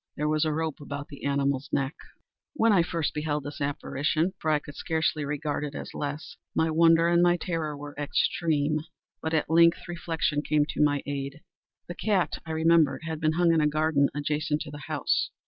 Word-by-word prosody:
There 150 - 0
was 155 +1 +2
a 155 - +1
rope 160 -1 -2
about 145 0 -6
the 140 - -9
animal's 140 -1 0
neck. 135 +2 0 0.6
When 230 -6 +3
I 185 - +5
first 165 -2 -1
beheld 150 -1 -2
this 145 +2 -7
apparition—for 155 +5 -1
I 155 - +4
could 145 -1 -9
scarcely 160 -2 -1
regard 150 +1 -2
it 145 -1 -5
as - - -7
less—my 145 +2 -3
wonder 165 +1 +5
and 170 0 +4
my 175 0 +4
terror 160 -5 -3
were 145 0 -8
extreme. 150 0 +1 0.4
But 160 0 -1
at 150 - +1
length 170 +2 +4
reflection 165 -3 -1
came 150 -1 +2
to 145 - -2
my 145 -1 +2
aid. 140 +1 -4 0.5
The 175 - -5
cat, 195 -1 0
I - - -4
remembered, 160 -2 +3
had 160 -1 -4
been 155 -1 +1
hung 170 0 +3
in 160 - +3
a 150 - +3
garden 155 -1 +2
adjacent 150 +1 -1
to 150 - -6
the 145 0 -9
house. - - 0
155 Hz, 190 wpm, -27 LUFS, 145-165 Hz, 0.6 s, I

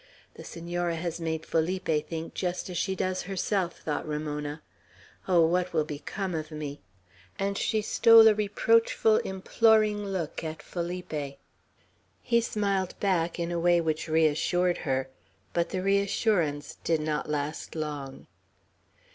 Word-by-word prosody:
"The - - -11
Senora 175 0 -3
has 170 0 -4
made 160 -1 -2
Felipe 165 -2 0
think 165 0 -5
just 180 0 -3
as 175 - -4
she 190 0 -1
does 185 0 -1
herself," 190 -2 -1
thought 155 0 -3
Ramona. 150 0 -4 0.6
"Oh, 175 -3 +5
what 180 +2 0
will 155 -2 +2
become 175 +6 -4
of 155 -1 -3
me!" 150 -2 -6 0.6
and 200 0 -1
she 215 +1 0
stole 225 +1 +7
a 220 - +7
reproachful, 220 +1 +3
imploring 210 +2 +2
look 185 -7 -3
at 160 0 -6
Felipe. 170 -5 -4 0.9
He 235 -1 +3
smiled 200 -4 -1
back 175 -4 +1
in 170 0 -2
a 170 - -1
way 175 0 +4
which 160 -1 -1
reassured 160 +3 +2
her; 130 0 0 0.5
but 170 -1 0
the 185 -1 -3
reassurance 195 -6 +1
did 165 -1 +1
not 150 -1 -2
last 150 +2 -3
long. 145 -4 -5
175 Hz, 140 wpm, -28 LUFS, 155-195 Hz, 0.9 s, stole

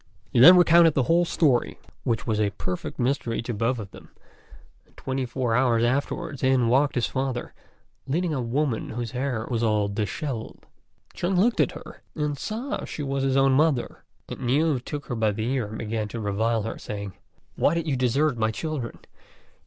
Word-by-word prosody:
He - - +3
then 175 +9 +10
recounted 170 -2 +6
the 135 - +3
whole 170 +5 +3
story, 145 -7 +1 0.3
which 115 -2 -1
was 110 -2 0
a 105 - +2
perfect 90 -2 -5
mystery 125 -2 -1
to 120 - -4
both 115 +4 0
of 105 -4 -7
them; - - -14 0.8
and - - -30
twenty 130 -1 -3
four 120 -1 -1
hours 120 -2 +3
afterwards 140 +4 -1
in 130 -3 +3
walked 135 +4 +3
his 120 - +1
father, 130 -2 -3 0.5
leading 165 +4 0
a 135 - -1
woman 125 0 -1
whose 120 -1 -4
hair 125 -3 -2
was 115 -2 0
all 105 -3 +2
dishevelled. 110 +4 -4 0.5
Chung 180 +2 -1
looked 225 +6 +2
at - - +2
her - - -11
and 150 -2 -1
saw 245 +7 -3
that - - -7
she 150 - -5
was 135 0 -2
his 135 0 +1
own 135 0 +4
mother; 140 -2 +1 0.2
and - - -7
Niu 140 +3 +1
took 145 +3 -6
her 120 - -4
by 110 -1 +1
the 110 +2 -3
ear 125 -6 -1
and 110 +1 -7
began 110 -1 -3
to 115 - -6
revile 110 +2 0
her, 115 - -5
saying, 100 -2 -6 0.4
"Why 160 - +2
did 170 -1 -1
you 145 - +1
desert 130 +2 +1
my 110 0 +2
children?" 135 0 -4
125 Hz, 190 wpm, -25 LUFS, 115-145 Hz, 0.8 s, then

